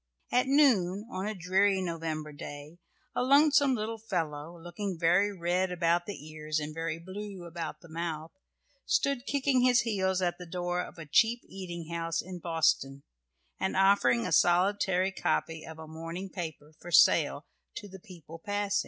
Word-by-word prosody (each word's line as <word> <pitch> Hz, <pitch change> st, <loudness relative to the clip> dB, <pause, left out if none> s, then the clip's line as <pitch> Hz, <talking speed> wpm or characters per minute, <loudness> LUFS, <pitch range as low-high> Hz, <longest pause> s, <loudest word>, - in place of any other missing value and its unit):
At 250 Hz, +1 st, +3 dB
noon, 225 Hz, -8 st, +3 dB
on 190 Hz, +2 st, -3 dB
a 215 Hz, -, -3 dB
dreary 190 Hz, +2 st, +2 dB
November 165 Hz, -4 st, -3 dB
day, 145 Hz, +3 st, -9 dB, 0.4 s
a -, -, +1 dB
lonesome 280 Hz, +1 st, +5 dB
little 220 Hz, 0 st, -4 dB
fellow, 165 Hz, -5 st, -4 dB
looking 175 Hz, +2 st, -5 dB
very 180 Hz, +5 st, +3 dB
red 180 Hz, 0 st, 0 dB
about 175 Hz, 0 st, +1 dB
the 195 Hz, -7 st, -7 dB
ears 155 Hz, 0 st, -3 dB
and 150 Hz, 0 st, -5 dB
very 165 Hz, 0 st, -3 dB
blue 190 Hz, +2 st, -8 dB
about 165 Hz, -2 st, -6 dB
the 170 Hz, -, -14 dB
mouth, 160 Hz, -1 st, -4 dB, 0.6 s
stood 275 Hz, -2 st, +1 dB
kicking 275 Hz, -2 st, +2 dB
his 250 Hz, -1 st, +5 dB
heels 190 Hz, -4 st, 0 dB
at 175 Hz, -1 st, -1 dB
the 180 Hz, -, -8 dB
door 175 Hz, +1 st, -2 dB
of 180 Hz, -, -9 dB
a 165 Hz, -, -8 dB
cheap 230 Hz, +10 st, +3 dB
eating 170 Hz, -3 st, -7 dB
house 165 Hz, 0 st, -2 dB
in 180 Hz, 0 st, -5 dB
Boston, 145 Hz, -5 st, 0 dB, 0.6 s
and 190 Hz, -, -1 dB
offering 190 Hz, -12 st, +4 dB
a -, -, -3 dB
solitary 185 Hz, +3 st, +3 dB
copy 160 Hz, -4 st, -1 dB
of 160 Hz, 0 st, -9 dB
a 160 Hz, 0 st, -9 dB
morning 165 Hz, +4 st, -7 dB
paper 160 Hz, -4 st, -7 dB
for 175 Hz, -, -10 dB
sale -, -, +4 dB, 0.3 s
to 210 Hz, -3 st, -7 dB
the 190 Hz, 0 st, -11 dB
people 165 Hz, -4 st, -12 dB
passing. 205 Hz, +2 st, -1 dB
180 Hz, 165 wpm, -30 LUFS, 165-205 Hz, 0.6 s, lonesome